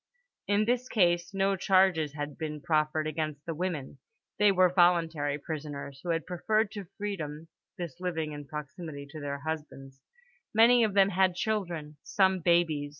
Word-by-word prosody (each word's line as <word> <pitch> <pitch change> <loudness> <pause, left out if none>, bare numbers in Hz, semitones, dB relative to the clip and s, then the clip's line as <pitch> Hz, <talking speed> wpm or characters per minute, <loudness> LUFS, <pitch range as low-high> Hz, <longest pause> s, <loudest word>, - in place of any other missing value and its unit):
In 205 +1 +2
this 245 +2 0
case 175 -4 +2
no 195 0 +1
charges 185 -6 +3
had 145 -1 -5
been 150 -1 -5
preferred 155 0 0
against 155 -2 -3
the 165 - -3
women; 155 -5 -4 0.4
they 210 -1 +6
were 185 -2 +4
voluntary 165 -5 +3
prisoners, 145 -2 -6
who 175 - -6
had 165 -1 0
preferred 215 +4 0
to 200 -4 -7
freedom 165 -6 -5 0.3
this 170 -6 -6
living 165 -4 -2
in 145 -1 -8
proximity 150 0 -7
to 155 - -8
their 140 -1 -4
husbands. 140 -3 -6 0.5
Many 235 +2 +6
of 210 -3 0
them 195 -1 +5
had 185 -1 +2
children; 175 -8 -3
some 190 -2 +2
babies. 165 -4 +2
165 Hz, 155 wpm, -29 LUFS, 150-190 Hz, 0.5 s, they